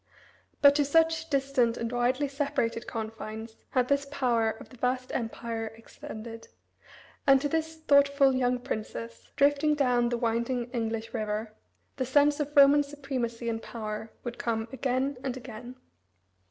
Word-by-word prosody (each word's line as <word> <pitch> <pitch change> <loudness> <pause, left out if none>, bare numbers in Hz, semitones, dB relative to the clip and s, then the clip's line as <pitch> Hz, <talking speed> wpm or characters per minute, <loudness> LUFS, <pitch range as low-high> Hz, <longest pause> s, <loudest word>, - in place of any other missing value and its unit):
But 280 0 +9
to 295 - +4
such 325 +2 +2
distant 270 -4 +1
and 230 0 -3
widely 250 +4 +1
separated 275 -5 -2
confines 220 0 -6
had 250 -1 +1
this 280 +1 +1
power 240 -5 +1
of 220 - -8
the 255 - -15
vast 255 +1 -1
Empire 230 -1 -3
extended; 225 0 -9 0.8
and 270 -1 +7
to 290 - -1
this 320 +2 -2
thoughtful 280 -2 +4
young 250 -1 +1
princess, 115 - -6
drifting 290 +2 +3
down 250 -4 +2
the 240 - -1
winding 235 +1 -1
English 225 -2 -3
river, 215 0 -3 0.4
the 260 - 0
sense 290 +2 +4
of 295 -1 -2
Roman 285 +1 +8
supremacy 265 -5 -4
and 225 -1 -2
power 215 -1 -6
would 240 -1 -6
come 225 -1 -1
again 265 +1 -1
and 260 -1 -3
again. 245 0 -9
250 Hz, 145 wpm, -28 LUFS, 230-280 Hz, 0.8 s, But